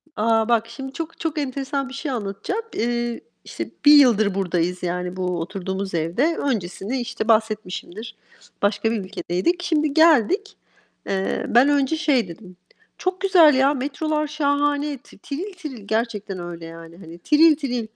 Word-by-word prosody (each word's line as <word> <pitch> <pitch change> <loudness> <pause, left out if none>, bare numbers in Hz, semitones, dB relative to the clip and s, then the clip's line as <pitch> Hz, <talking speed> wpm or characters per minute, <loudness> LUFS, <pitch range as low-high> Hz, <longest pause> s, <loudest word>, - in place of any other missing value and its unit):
A, 225 +1 +2
bak 230 -1 +2
şimdi 265 +3 -8
çok 330 +1 -6
çok 325 -2 -3
enteresan 275 0 -3
bir - - -10
şey 275 +1 -4
anlatacağım. 225 - -3
Iıı, 240 0 -1 0.3
işte - - -6 0.2
1 295 - +9
yıldır 220 -9 +5
buradayız, 180 -1 -1
yani, 180 +1 -3
bu 185 0 -3
oturduğumuz 190 +2 -4
evde. 210 - 0
Öncesini, 220 0 -2
işte, 240 -2 -4
bahsetmişimdir, 220 -1 -1 0.5
başka 205 +2 +1
bir 230 - 0
ülkedeydik. 200 - -2
Şimdi 305 -4 +1
geldik. 330 - +3 0.5
Eee, 190 0 -1
ben 250 +5 +5
önce 285 +1 +2
şey 285 - +2
dedim, 180 +1 -12 0.4
çok 370 0 -2
güzel 355 -6 +6
ya, 270 +2 +4
metrolar 300 +3 -2
şahane, 290 0 0
ti 245 - -19
tiril 335 - -6
tiril, 280 - -9
gerçekten 215 -4 -2
öyle 175 -1 -7
yani, 165 0 -11
hani, 170 -2 -11
tiril 305 - +5
tiril, 250 -6 -3
240 Hz, 150 wpm, -22 LUFS, 195-290 Hz, 0.5 s, 1